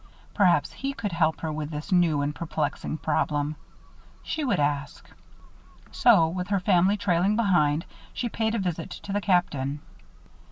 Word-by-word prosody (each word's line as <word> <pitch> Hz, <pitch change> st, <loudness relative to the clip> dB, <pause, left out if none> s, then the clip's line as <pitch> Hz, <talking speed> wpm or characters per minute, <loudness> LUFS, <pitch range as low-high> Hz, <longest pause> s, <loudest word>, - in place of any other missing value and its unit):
Perhaps 180 Hz, -4 st, +3 dB
he 275 Hz, +1 st, -4 dB
could 210 Hz, -7 st, -4 dB
help 160 Hz, -1 st, +1 dB
her 160 Hz, -1 st, -3 dB
with 150 Hz, -1 st, -4 dB
this 155 Hz, +5 st, -6 dB
new 165 Hz, -5 st, +3 dB
and 145 Hz, +1 st, -2 dB
perplexing 155 Hz, 0 st, -3 dB
problem. 145 Hz, 0 st, -1 dB, 0.7 s
She 315 Hz, -, -3 dB
would 255 Hz, -, +1 dB
ask. 145 Hz, 0 st, -2 dB, 0.8 s
So, 165 Hz, -, +5 dB
with 180 Hz, +2 st, -4 dB
her 200 Hz, -1 st, +1 dB
family 185 Hz, +2 st, +3 dB
trailing 195 Hz, 0 st, +1 dB
behind, 170 Hz, -8 st, +2 dB, 0.3 s
she 245 Hz, -, -3 dB
paid 220 Hz, 0 st, -1 dB
a -, -, +1 dB
visit 175 Hz, -5 st, -3 dB
to 200 Hz, -, -7 dB
the 205 Hz, -, 0 dB
Captain. 150 Hz, -8 st, 0 dB
170 Hz, 155 wpm, -26 LUFS, 150-200 Hz, 0.8 s, So